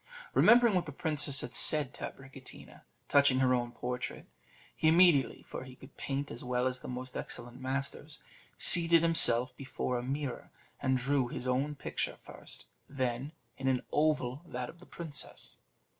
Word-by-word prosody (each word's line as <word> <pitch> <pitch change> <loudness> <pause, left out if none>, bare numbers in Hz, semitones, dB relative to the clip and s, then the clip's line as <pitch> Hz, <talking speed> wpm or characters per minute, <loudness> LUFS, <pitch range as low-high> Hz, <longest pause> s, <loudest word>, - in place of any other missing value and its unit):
Remembering 235 -2 +5
what 180 -3 0
the - - -6
princess 150 -3 -1
had - - -7
said 150 -3 +3
to - - -6
Abricotina 130 -1 -14 0.3
touching 140 -2 +4
her 130 -1 +2
own 120 -1 -1
portrait, 125 +1 -5 0.5
he 155 - 0
immediately 165 -4 +4
(for - - -7
he 130 -1 -12
could 130 +1 -16
paint 140 +1 -4
as 120 - -8
well 125 0 -1
as 130 0 -1
the - - -10
most 125 0 -7
excellent 120 +2 -8
masters) 135 +2 -4 0.4
seated 170 -1 +7
himself 125 -7 +5
before 125 -1 -4
a - - -5
mirror, 135 0 -5 0.3
and 130 0 +1
drew 135 0 0
his 125 - -6
own 135 +4 -1
picture 140 - -4
first; - - -12 0.2
then, 130 0 -3 0.3
in 135 - -3
an 130 -1 0
oval, 150 -3 0
that 125 -4 -5
of 170 - -23
the 180 - -16
princess. 160 -4 -6
135 Hz, 165 wpm, -31 LUFS, 125-150 Hz, 0.5 s, seated